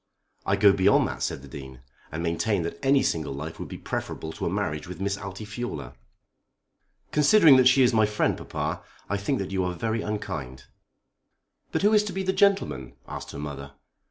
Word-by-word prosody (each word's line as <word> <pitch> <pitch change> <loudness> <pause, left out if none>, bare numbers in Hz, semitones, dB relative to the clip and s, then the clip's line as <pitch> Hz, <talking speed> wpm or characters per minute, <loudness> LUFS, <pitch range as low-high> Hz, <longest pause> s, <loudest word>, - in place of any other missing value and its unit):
"I 100 - +3
go 100 0 +6
beyond 100 +1 +4
that," - - -6
said 65 - -2
the - - -11
Dean, 65 -1 -10 0.3
"and 80 +2 -4
maintain 85 +3 0
that 85 0 -6
any 135 0 +4
single 80 -4 -1
life 75 +3 -6
would - - -5
be - - -7
preferable 80 - -4
to - - -3
a - - +1
marriage 75 +1 -2
with 90 0 -8
Miss 100 0 -1
Altifiorla." 100 - -6 1.2
"Considering 150 -1 +6
that 130 -1 +6
she 130 +1 +6
is 125 - +3
my 110 -1 +4
friend, 105 0 +1
papa, - - -4 0.3
I 100 - +1
think 100 +8 -1
that 95 -3 -4
you 95 -1 0
are 90 0 -1
very 110 +5 -1
unkind." 85 -13 -5 1.1
"But - - -1
who 210 +2 +5
is 210 -1 +5
to 200 - -4
be 190 +1 -2
the 190 0 0
gentleman?" 200 0 +1
asked - - -7
her - - -8
mother. 70 -1 -7
100 Hz, 195 wpm, -26 LUFS, 80-125 Hz, 1.2 s, go